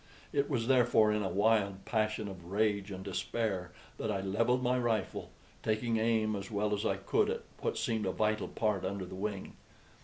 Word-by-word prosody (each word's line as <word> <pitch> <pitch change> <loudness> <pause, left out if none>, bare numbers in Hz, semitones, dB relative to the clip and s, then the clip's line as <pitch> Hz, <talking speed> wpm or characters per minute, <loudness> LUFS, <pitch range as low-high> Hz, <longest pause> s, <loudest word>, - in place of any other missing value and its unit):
It 140 +1 +1
was 120 -6 0
therefore 120 -4 +5
in 105 0 +1
a 95 - -1
wild 100 -2 +2
passion 110 -1 0
of 95 -3 -8
rage 100 +1 +1
and 95 -1 -6
despair 95 -2 -2 0.3
that 110 - -2
I 100 - -1
levelled 115 +6 +1
my 125 0 +2
rifle, 115 -5 -1 0.3
taking 110 +1 0
aim 110 -1 +2
as 100 -1 -5
well 105 0 0
as 105 - -1
I - - +1
could - - +1
at - - -2 0.2
what - - -1
seemed 110 -3 0
a - - +1
vital 110 +2 0
part 105 -4 0
under 95 0 -2
the 90 - -10
wing. 100 +1 -4
105 Hz, 190 wpm, -32 LUFS, 100-115 Hz, 0.3 s, therefore